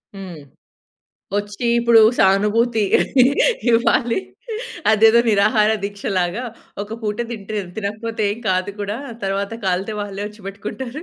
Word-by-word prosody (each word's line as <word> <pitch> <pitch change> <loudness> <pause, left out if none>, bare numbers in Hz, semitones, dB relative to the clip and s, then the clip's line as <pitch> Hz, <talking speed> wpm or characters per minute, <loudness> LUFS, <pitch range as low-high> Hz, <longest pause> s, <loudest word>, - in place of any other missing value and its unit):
హ్మ్. 185 -5 -8 1.0
వచ్చి 205 +3 -3
ఇప్పుడు 235 -1 +5 0.2
సానుభూతి 210 +4 +3 0.9
ఇవ్వాలి. 235 0 +2 0.7
అదేదో 220 +2 +6
నిరాహార 210 +1 +3
దీక్ష 200 0 -6
లాగా, 180 +6 0 0.4
ఒక 215 +2 -7
పూట 210 -1 -2
తింటే 215 -2 -4 0.2
తినకపోతే 220 +2 -3
ఏం 215 - -8
కాదు 185 +1 0
కూడా. 205 +1 -3 0.3
తరువాత 195 +1 -2
కాలితే 190 +3 -1
వాళ్ళే 200 -1 -5
ఒచ్చి 210 +1 -16
పెట్టుకుంటారు. 235 +8 -6
210 Hz, 115 wpm, -20 LUFS, 200-225 Hz, 1.0 s, అదేదో